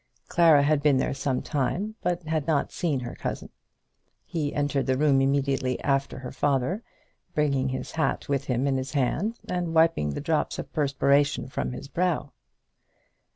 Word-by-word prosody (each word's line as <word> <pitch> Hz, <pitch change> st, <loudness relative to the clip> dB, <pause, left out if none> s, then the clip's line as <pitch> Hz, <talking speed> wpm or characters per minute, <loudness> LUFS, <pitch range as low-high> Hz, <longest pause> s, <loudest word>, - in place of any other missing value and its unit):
Clara 165 Hz, -5 st, +5 dB
had 150 Hz, 0 st, +2 dB
been 145 Hz, -2 st, +4 dB
there 130 Hz, -, 0 dB
some 135 Hz, -2 st, -1 dB
time, 170 Hz, +9 st, -1 dB
but 175 Hz, -1 st, -1 dB
had 155 Hz, -2 st, -2 dB
not 150 Hz, -4 st, +1 dB
seen 150 Hz, -7 st, -1 dB
her 120 Hz, -1 st, -6 dB
cousin. -, -, -5 dB, 0.7 s
He 150 Hz, -4 st, -2 dB
entered 145 Hz, -1 st, 0 dB
the 130 Hz, 0 st, +2 dB
room 140 Hz, -2 st, +4 dB
immediately 135 Hz, -2 st, +1 dB
after 135 Hz, -1 st, 0 dB
her 130 Hz, -1 st, -7 dB
father, 145 Hz, -, 0 dB, 0.5 s
bringing 140 Hz, -3 st, +1 dB
his 130 Hz, 0 st, -4 dB
hat 160 Hz, -3 st, -1 dB
with 140 Hz, -1 st, -1 dB
him 125 Hz, 0 st, 0 dB
in 135 Hz, -1 st, +1 dB
his 130 Hz, +2 st, -4 dB
hand, 160 Hz, -, 0 dB
and 175 Hz, -2 st, -2 dB
wiping 160 Hz, -, +3 dB
the -, -, -3 dB
drops 155 Hz, +1 st, 0 dB
of -, -, -7 dB
perspiration 140 Hz, -1 st, +2 dB
from 135 Hz, -, -3 dB
his 130 Hz, -, -7 dB
brow. 170 Hz, -2 st, -1 dB
140 Hz, 165 wpm, -26 LUFS, 135-160 Hz, 0.7 s, Clara